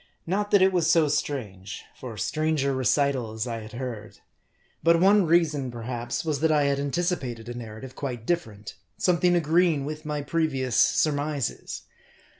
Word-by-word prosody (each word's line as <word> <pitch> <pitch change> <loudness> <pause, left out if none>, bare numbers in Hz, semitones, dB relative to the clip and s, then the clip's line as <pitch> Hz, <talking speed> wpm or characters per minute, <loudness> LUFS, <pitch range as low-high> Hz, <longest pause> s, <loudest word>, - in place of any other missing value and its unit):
Not 205 +4 -1
that 200 -2 +5
it 190 0 +4
was 170 -3 +2
so 165 -2 +5
strange; 105 -10 -3
for 120 -4 -8
stranger 150 +4 0
recitals 130 -3 0
I 115 -2 -4
had 110 0 -10
heard. 120 -4 -6 0.6
But 165 0 +4
one 195 0 +5
reason, 155 -5 +2
perhaps, 120 +3 -4
was 150 -3 -1
that 160 +1 +2
I 150 -1 +3
had 140 0 +1
anticipated 140 -6 -2
a 120 - -5
narrative 120 +2 -8
quite 125 -5 -5
different; 110 -12 -3 0.2
something 180 0 +3
agreeing 165 -2 +2
with 155 +1 -5
my 150 -2 -3
pre 165 +2 +1
vious 130 -3 -3
surmises. 145 +1 +1
140 Hz, 155 wpm, -26 LUFS, 120-165 Hz, 0.6 s, that